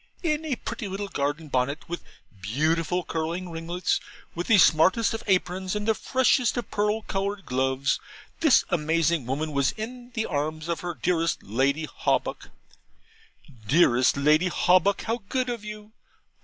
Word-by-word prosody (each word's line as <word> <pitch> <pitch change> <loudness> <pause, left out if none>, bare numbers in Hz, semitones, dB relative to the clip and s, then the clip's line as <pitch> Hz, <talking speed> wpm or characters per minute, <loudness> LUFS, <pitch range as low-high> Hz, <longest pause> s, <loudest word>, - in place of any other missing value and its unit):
In 310 -1 0
a 290 -5 -1
pretty 220 - -5
little 195 +1 -4
garden 145 +2 -2
bonnet, 140 +2 -1
with 175 +1 -5 0.4
beautiful 160 - 0
curling 170 +3 -3
ringlets, 165 +2 -1 0.3
with 175 +1 -4
the 225 - +6
smartest 185 +7 +4
of 225 - -4
aprons 185 0 0
and 210 +1 -3
the 220 - +4
freshest 255 +1 +2
of 240 - -4
pearl 210 +1 0
coloured 200 0 -3
gloves, 130 +1 0 0.4
this 315 -5 +5
amazing 160 -3 +1
woman 150 +4 -2
was 140 -2 +1
in 240 +3 -7
the 220 -1 0
arms 155 +2 -3
of 170 -2 -2
her 175 -1 -4
dearest 165 -2 0
Lady 135 +9 0
Hawbuck. - - -2 1.2
'Dearest 130 -3 +4
Lady 155 +5 +4
Hawbuck, 185 +2 +3
how 230 +1 -2
good 255 -1 0
of 235 -3 -5
you! 210 0 -9
175 Hz, 150 wpm, -26 LUFS, 155-210 Hz, 1.2 s, the